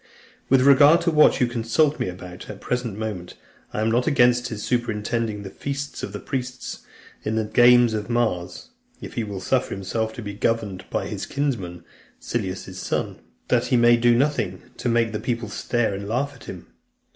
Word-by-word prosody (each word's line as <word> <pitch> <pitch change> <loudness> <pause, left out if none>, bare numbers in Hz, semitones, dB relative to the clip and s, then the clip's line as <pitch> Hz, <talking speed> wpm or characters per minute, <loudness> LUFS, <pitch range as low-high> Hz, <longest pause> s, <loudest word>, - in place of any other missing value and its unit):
With 135 -1 +5
regard 145 +5 +7
to 170 0 +1
what 150 -2 +5
you 125 - +4
consult 120 +6 +1
me - - -1
about 90 0 -9
at - - -10
the - - -7
present 125 -5 -3
moment, 105 -5 -5 0.4
I - - -2
am 110 +1 +1
not 120 +4 +1
against 125 -4 +4
his 110 -3 -6
superintending 115 -2 -1
the 95 - -8
feast 140 +4 -5
of - - -5
the 105 - -6
priests, 130 +1 -5 0.4
in 110 - -1
the 110 - +1
games 120 +1 +5
of 105 +1 -3
Mars, 115 - -1 0.3
if - - -9
he 115 - -2
will 100 -3 -5
suffer 130 +6 0
himself 110 +3 -2
to 120 - -7
be 100 -1 -5
governed 105 -3 -1
by - - -2
his - - -5
kinsman, 115 -12 -3 0.4
Silanus's 95 -6 -4
son, - - -3 0.3
that - - +2
he 125 - +3
may 120 0 +6
do 120 0 +4
nothing 120 -10 0
to 120 - -2
make 115 -1 +2
the 105 - -3
people 115 -3 -3
stare 110 +1 -1
and 100 +1 -5
laugh 135 +6 -1
at 125 - -15
him. 90 -2 -8
115 Hz, 190 wpm, -23 LUFS, 105-125 Hz, 0.4 s, regard